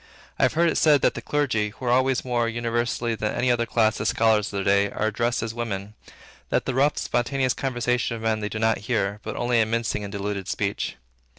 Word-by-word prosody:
I - - +2
have - - +1
heard 170 +2 +3
it - - +1
said 150 -3 +5
that - - +4
the - - -6
clergy, 125 -8 0
who 115 +5 -10
are 120 - +2
always, 130 +1 +2
more 120 -2 0
universally 120 0 -1
than 110 -1 -2
any 125 0 +2
other 120 -1 +1
class, 110 -2 +2
the - - -3
scholars 110 -2 +3
of - - -8
their 100 -1 -1
day, 100 +1 +3
are 110 - -2
addressed 120 +2 0
as 115 0 -4
women; 105 -3 -4 0.6
that - - 0
the 130 - -1
rough, 140 +3 +2
spontaneous 130 +2 0
conversation 125 -2 -1
of 110 - -9
men 110 -1 +1
they 105 0 -3
do 110 - -5
not 110 -1 +1
hear, 105 -3 0
but - - -6
only 120 -1 +2
a - - +3
mincing 115 -2 -1
and 100 - -6
diluted 100 -1 -4
speech. 100 0 -2
115 Hz, 230 wpm, -24 LUFS, 105-125 Hz, 0.6 s, said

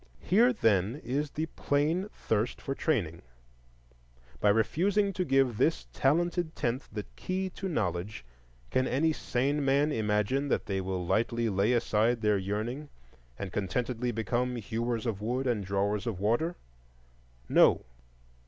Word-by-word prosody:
Here, 230 +7 +4
then, 110 - +2
is 140 +5 -1
the 155 +3 -2
plain 160 +5 0
thirst 110 +2 -1
for 135 - -3
training; 100 - -1 1.2
by 105 - +3
refusing 195 - +2
to 185 - -1
give 135 -7 +2
this 160 - +2
Talented 170 +3 +1
Tenth 125 0 -2
the 105 -1 -5
key 185 0 -3
to 190 +1 -5
knowledge, 90 - -2 0.5
can 130 0 +2
any 160 +5 +2
sane 140 +2 0
man 140 +3 +3
imagine 110 +4 0
that - - 0
they 95 -1 -1
will 95 -1 -3
lightly 115 +4 +1
lay 100 +4 +2
aside 115 0 +2
their 105 -2 +2
yearning 110 +9 -3 0.5
and 95 -2 -6
contentedly 120 +4 -1
become 120 +3 -1
hewers 115 +1 -2
of 105 -4 -2
wood 125 +5 -1
and 120 -5 0
drawers 100 +3 -1
of 105 -6 -3
water? 120 - +1 0.9
No. - - +5
120 Hz, 140 wpm, -30 LUFS, 105-145 Hz, 1.2 s, No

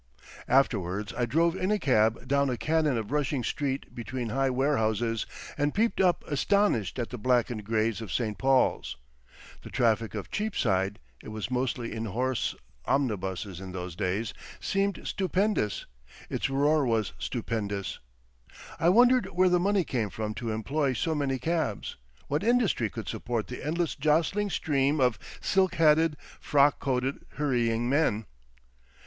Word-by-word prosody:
Afterwards 105 -6 +1
I 120 -1 -1
drove 165 +7 +2
in 185 0 -1
a 210 - +3
cab 115 - +2
down 140 0 +2
a 125 - -1
canon 155 -3 +1
of 110 +1 -4
rushing 145 -3 0
street 135 +2 -2
between 120 +1 -4
high 135 +4 +1
warehouses, 115 -4 0 0.3
and 145 +1 +1
peeped 225 +1 +2
up 180 -2 +3
astonished 160 - +1
at 120 -2 -3
the 125 - -6
blackened 120 -2 +1
greys 110 0 0
of 110 - -7
Saint 110 -4 -2
Paul's. 135 - +2 0.6
The - - -10
traffic 115 -2 +1
of 105 - -6
Cheapside—it 95 - -2
was 110 +3 -5
mostly 125 -2 -1
in 110 0 -3
horse 125 +4 -1 0.3
omnibuses 95 -8 -1
in 95 -1 -7
those 90 -2 -5
days—seemed 115 - -2
stupendous, 190 - 0 0.5
its - - -1
roar 145 +3 +3
was 115 -4 0
stupendous; 105 -5 -3 0.8
I 165 - +4
wondered 245 +5 +5
where 185 +2 +3
the 180 0 +3
money 195 +1 +2
came 120 -8 -2
from 110 0 -4
to 115 +2 -4
employ 130 +6 0
so 160 +7 -1
many 140 -3 0
cabs, 155 -5 -2 0.3
what 145 +5 -1
industry 225 - +2
could 115 0 -7
support 120 -3 -2
the 125 - -7
endless 165 +2 -1
jostling 160 +8 +1
stream 145 -4 +1
of 125 -5 +2 0.2
silk 190 -1 +2
hatted, 160 -1 +4 0.2
frock 145 0 +3
coated, 130 0 -1
hurrying 120 -5 +1
men. 125 -6 +1
130 Hz, 145 wpm, -28 LUFS, 110-155 Hz, 0.8 s, wondered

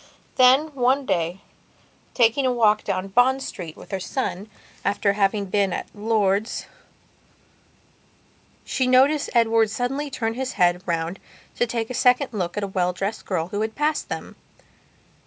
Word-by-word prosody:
Then, 265 +4 +5
one 265 +1 +1
day, 175 0 -1 0.7
taking 240 +3 +3
a - - +2
walk 215 -3 +3
down 195 -1 -2
Bond 260 +5 +3
Street 170 -9 -7
with - - -13
her 195 - -2
son, 205 -1 -4 0.3
after 200 0 +1
having 200 0 +1
been 195 0 +1
at - - -3
Lord's, 210 0 0 2.0
she 260 - 0
noticed 275 +4 +4
Edward 225 -1 +4
suddenly 265 +6 -2
turn 225 -4 -2
his 260 +2 -4
head 180 -1 +2
round 170 +2 -2 0.4
to 240 - +1
take 230 0 -3
a - - -3
second 250 +1 +2
look 180 -3 -3
at 205 - -1
a - - -1
well 180 -2 0
dressed 195 +4 -4
girl 170 -3 -2
who 205 +2 -3
had 220 0 -3
passed 300 +1 -1
them. - - -6
220 Hz, 155 wpm, -23 LUFS, 195-255 Hz, 2.0 s, Then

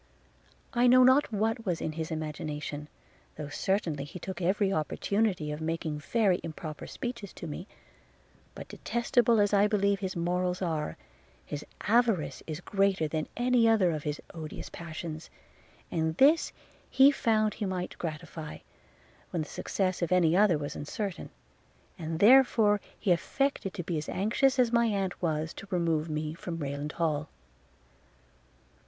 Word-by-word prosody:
– - - -34 0.3
I 245 0 +4
know 255 +1 +7
not 260 +1 +5
what 225 +2 0
was 180 -6 -1
in 160 - -2
his 160 0 -4
imagination, 150 -2 -4 0.5
though 150 -2 -6
certainly 165 -3 -1
he 150 +6 -8
took 190 +2 -6
every 195 +2 +2
opportunity 180 +1 0
of 150 +1 -5
making 160 -1 -2
very 195 +2 +2
improper 155 -1 -6
speeches 235 -6 -5
to - - -8
me; 170 +5 -6 0.9
but - - -8
detestable 235 -1 +1
as 205 0 +3
I 205 +1 +5
believe 200 -1 +2
his 190 -2 -3
morals 180 +1 0
are, 160 -5 -2 0.5
his 145 - -5 0.2
avarice 205 - +2
is 155 -2 -5
greater 195 -5 +1
than 155 0 -2
any 245 -1 +4
other 200 -6 +4
of 155 -2 -3
his 150 0 -3
odious 155 -2 -7
passions; 160 -1 -7 0.6
and 160 -1 -1
this 300 +5 +5 0.4
he 270 +2 +7
found 215 -5 +1
he 210 - -3
might 180 -1 -3
gratify, 160 -1 -6 0.7
when 165 - -2
the - - -9
success 185 -2 -2
of 170 0 -1
any 175 -2 +4
other 195 -4 +5
was 145 -1 -5
uncertain; 195 +5 -4 0.7
and 160 -1 -3
therefore 215 -1 +6 0.2
he 190 - +1
affected 270 +4 0
to 180 - -4
be 165 -2 -2
as 150 - -6
anxious 235 +8 +2
as 245 -2 +3
my 235 0 +4
aunt 195 -4 -2
was, 160 -2 -1
to 200 - -10
remove 165 -3 0
me 155 0 -2
from 165 0 -6
Rayland 145 0 -4
Hall. 155 -2 -1
180 Hz, 155 wpm, -29 LUFS, 155-210 Hz, 0.9 s, know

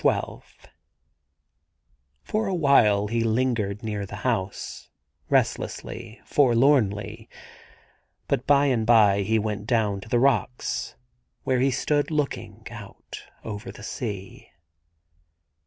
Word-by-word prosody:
95 - - 0
XII - - -23 1.6
^OR 215 -1 +1
a 190 - 0
while 115 - +4
he 115 +2 0
lingered 110 -3 0
near 105 -2 -3
the 100 +1 -7
house, 105 -7 -3 0.4
restlessly, 115 +1 -1
forlornly, 120 -7 +2 1.0
but 125 - -1
by 145 0 +5
and 120 -5 +1
by 105 -4 +5
he 110 +3 +1
went 105 -1 -3
down 105 -5 +1
to 110 - -12
the 120 - +2
rocks, 125 -1 0 0.5
wheie 130 -1 +2
he 135 - +3
stood 145 +3 0
looking 150 -3 -3
out - - -10 0.2
over 105 0 -6
the - - -13
sea. 100 -5 -6
115 Hz, 115 wpm, -25 LUFS, 105-130 Hz, 1.6 s, by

